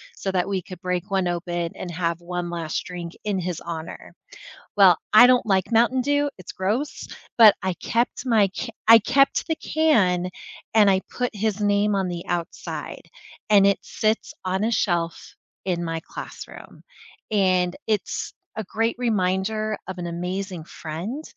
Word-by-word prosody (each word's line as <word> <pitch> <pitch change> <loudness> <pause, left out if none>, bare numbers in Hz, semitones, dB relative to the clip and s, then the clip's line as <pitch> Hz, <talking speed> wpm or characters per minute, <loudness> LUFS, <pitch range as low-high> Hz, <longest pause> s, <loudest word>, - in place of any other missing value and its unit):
so 195 - -3
that 180 -1 0
we 195 -2 -1
could 180 +1 -11
break 180 +1 -2
one 190 -2 +1
open 175 -1 -2
and 180 - -6
have 170 0 -2
one 175 0 -4
last 165 -2 -3
drink 175 -1 -7
in 205 -2 -1
his 180 -2 -4
honor. 165 -1 -7 0.6
Well, 190 -4 +7 0.2
I 245 +3 +10
don't 250 -2 +4
like 190 +1 +1
Mountain 240 +3 +3
Dew, 290 +2 +1
it's 180 - -8
gross, 215 +10 -2 0.3
but 220 -3 +9
I 190 -1 -1
kept 235 +6 -1
my 220 -6 +3
c 255 - -4 0.2
I 225 0 +10
kept 275 +5 +2
the 320 - 0
can, 190 - +2 0.4
and 210 -2 +6
I 190 -1 +3
put 245 -3 -3
his 210 0 -1
name 205 0 +2
on 190 -2 0
the 175 -1 -5
outside, 175 -1 -4 0.5
and 200 -1 +7
it 200 - +3
sits 220 +1 -1
on 190 +2 0
a 230 - +1
shelf 170 -6 0 0.5
in 175 -2 -1
my 165 -1 -3
classroom. - - -10 0.5
And 185 -3 +2
it's 210 -4 -2 0.2
a 220 - -3
great 225 +4 -1
reminder 215 -1 0
of 190 -1 -6
an 175 - -4
amazing 180 +1 -4
friend, 175 - -6
190 Hz, 165 wpm, -24 LUFS, 175-220 Hz, 0.6 s, I